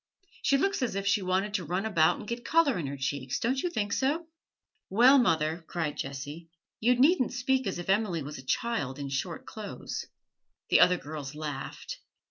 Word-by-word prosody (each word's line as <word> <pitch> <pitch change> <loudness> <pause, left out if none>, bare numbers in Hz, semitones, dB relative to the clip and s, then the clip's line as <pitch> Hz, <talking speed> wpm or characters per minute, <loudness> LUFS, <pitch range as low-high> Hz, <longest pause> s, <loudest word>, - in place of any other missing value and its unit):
She 275 - +3
looks 390 +3 0
as 240 -6 -1
if 195 0 -2
she 205 +1 +3
wanted 190 +3 0
to 195 -4 0
run 180 +6 -2
about 165 -7 +3
and - - -9
get 235 +1 -4
colour 315 - +3
in 150 - -3
her 140 +1 -5
cheeks, 135 -1 -2
don't 260 +3 0
you 355 - 0
think 205 -11 -2
so?' 295 +6 0 0.6
'Well, 250 +7 +7
mother,' 160 -6 +1
cried 160 -4 -2
Jessie, 145 +5 -6 0.3
'you 245 +3 +4
needn't 265 +2 +4
speak 260 -1 +1
as 190 - -2
if 175 - -6
Emily 190 -5 +1
was 145 0 -7
a - - -10
child 145 - -1
in 140 -1 -5
short 135 0 -3
clothes.' - - -6 0.6
The - - +6
other 180 0 +6
girls 150 -2 -7
laughed. 150 -3 -6
190 Hz, 190 wpm, -29 LUFS, 150-245 Hz, 0.6 s, Well